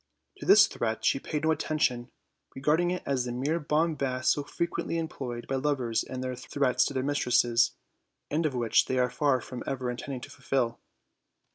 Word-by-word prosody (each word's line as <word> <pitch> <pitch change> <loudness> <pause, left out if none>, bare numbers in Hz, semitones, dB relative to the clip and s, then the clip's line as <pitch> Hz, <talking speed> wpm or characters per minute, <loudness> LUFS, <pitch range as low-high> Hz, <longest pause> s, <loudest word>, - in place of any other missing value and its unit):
To - - -8
this - - +9
threat 110 -1 -3
she 135 - +3
paid 150 +1 -4
no 160 - +3
attention, 130 -6 0 0.5
regarding 155 +6 +2
it 180 0 -2
as 135 -3 0
the 125 - -4
mere 140 +7 -1
bombast 150 -4 +1
so 145 - 0
frequently 170 +2 -2
employed 130 -7 -4
by 135 - -1
lovers 130 -5 0
in 130 -1 -6
their 130 0 -3
threats 130 +1 +1
to - - -3
their 130 - 0
mistresses, 125 -4 +2 0.6
and 155 +3 +1
which 120 -3 +2
they 130 - 0
are 125 0 +2
far 140 -4 +1
from 125 +2 -7
ever 130 -2 -2
intending 125 +1 -6
to - - -9
fulfill. 120 -4 -1
130 Hz, 175 wpm, -28 LUFS, 125-150 Hz, 0.6 s, this